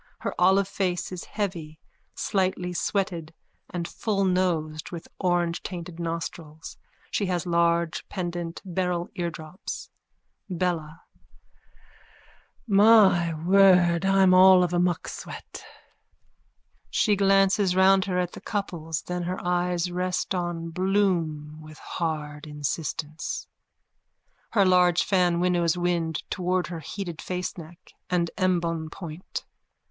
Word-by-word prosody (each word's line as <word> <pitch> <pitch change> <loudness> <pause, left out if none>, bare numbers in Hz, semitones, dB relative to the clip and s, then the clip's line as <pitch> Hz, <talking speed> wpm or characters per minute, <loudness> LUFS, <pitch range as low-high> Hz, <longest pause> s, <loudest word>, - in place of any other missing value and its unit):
Her - - -2
olive 190 +2 +4
face 185 -3 -2
is 180 -2 -6
heavy, 170 -7 -4 0.4
slightly 185 -2 -1
sweated 170 -4 -2 0.3
and 170 -1 -4
fullnosed 180 -7 -1
with 170 -2 -7 0.2
orangetainted 175 -1 -1
nostrils. 165 -2 -5 0.4
She 200 - 0
has 180 -1 -1
large 170 -1 +1
pendant 175 -2 -4
beryl 180 -1 -1
eardrops.)_ 170 +1 -6 0.6
BELLA: 170 -3 -2 1.6
My 200 -6 +5
word! 180 -2 +5
I'm 195 -1 +5
all 185 0 +8
of 175 0 -1
a 175 - +2
mucksweat. 175 -1 -3 1.3
_(She 210 - +3
glances 195 -1 +3
round 190 0 +5
her 185 -2 -1
at 180 -1 0
the - - -10
couples. 165 -6 -3
Then 180 0 -3
her 180 +2 -3
eyes 180 0 0
rest 180 +2 -1
on 175 -2 -3
Bloom 170 -5 0
with 155 0 -12
hard 150 -3 -4
insistence. 150 +1 -4 1.1
Her 200 -3 +4
large 180 -1 +4
fan 180 -3 +2
winnows 175 -1 +2
wind 170 -3 -1
towards 180 0 0
her 170 -2 -5
heated 170 +1 -6
faceneck 180 -1 -6 0.2
and 175 -2 +1
embonpoint. 170 -2 -2
175 Hz, 105 wpm, -26 LUFS, 165-185 Hz, 1.6 s, all